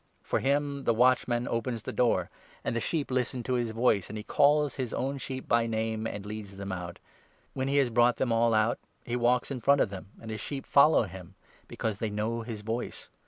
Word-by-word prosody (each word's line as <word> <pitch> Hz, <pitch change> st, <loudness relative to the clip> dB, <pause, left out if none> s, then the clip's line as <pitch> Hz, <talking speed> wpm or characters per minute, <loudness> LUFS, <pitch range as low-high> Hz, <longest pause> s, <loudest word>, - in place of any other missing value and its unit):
For -, -, 0 dB
him 140 Hz, 0 st, 0 dB
the 115 Hz, -, +3 dB
watchman 125 Hz, 0 st, +3 dB
opens 115 Hz, -1 st, -2 dB
the -, -, -4 dB
door; 125 Hz, -2 st, +1 dB, 0.3 s
and -, -, -2 dB
the 115 Hz, -, 0 dB
sheep 155 Hz, +2 st, -1 dB
3 -, -, -3 dB
listen 125 Hz, 0 st, -1 dB
to 130 Hz, -, -1 dB
his 120 Hz, -2 st, 0 dB
voice; 110 Hz, -4 st, +1 dB
and 110 Hz, -, -6 dB
he 105 Hz, -, -5 dB
calls 145 Hz, +2 st, +3 dB
his 130 Hz, -4 st, -3 dB
own 135 Hz, +1 st, -2 dB
sheep 130 Hz, 0 st, -6 dB
by 115 Hz, 0 st, +3 dB
name, 110 Hz, 0 st, -1 dB
and 100 Hz, -2 st, -6 dB
leads 105 Hz, -2 st, -7 dB
them 100 Hz, 0 st, -5 dB
out. 90 Hz, -2 st, -5 dB, 0.6 s
When 130 Hz, 0 st, -2 dB
he 140 Hz, +1 st, +1 dB
has 135 Hz, -4 st, +3 dB
brought 120 Hz, +1 st, +4 dB
them 130 Hz, -3 st, -1 dB
all 115 Hz, 0 st, +3 dB
out, 110 Hz, +2 st, +2 dB, 0.3 s
he 120 Hz, -, -2 dB
walks 125 Hz, +1 st, +2 dB
4 135 Hz, -, -3 dB
in -, -, -9 dB
front 140 Hz, +4 st, +4 dB
of 105 Hz, -, +2 dB
them, 95 Hz, -1 st, -7 dB
and 110 Hz, -, -8 dB
his 110 Hz, -1 st, -4 dB
sheep 135 Hz, +2 st, -5 dB
follow 145 Hz, -1 st, +5 dB
him, 95 Hz, -1 st, -10 dB, 0.3 s
because 110 Hz, -3 st, -3 dB
they 110 Hz, -, -1 dB
know 110 Hz, +3 st, -2 dB
his 110 Hz, -2 st, -6 dB
voice. 115 Hz, +3 st, -4 dB
115 Hz, 230 wpm, -29 LUFS, 110-130 Hz, 0.6 s, follow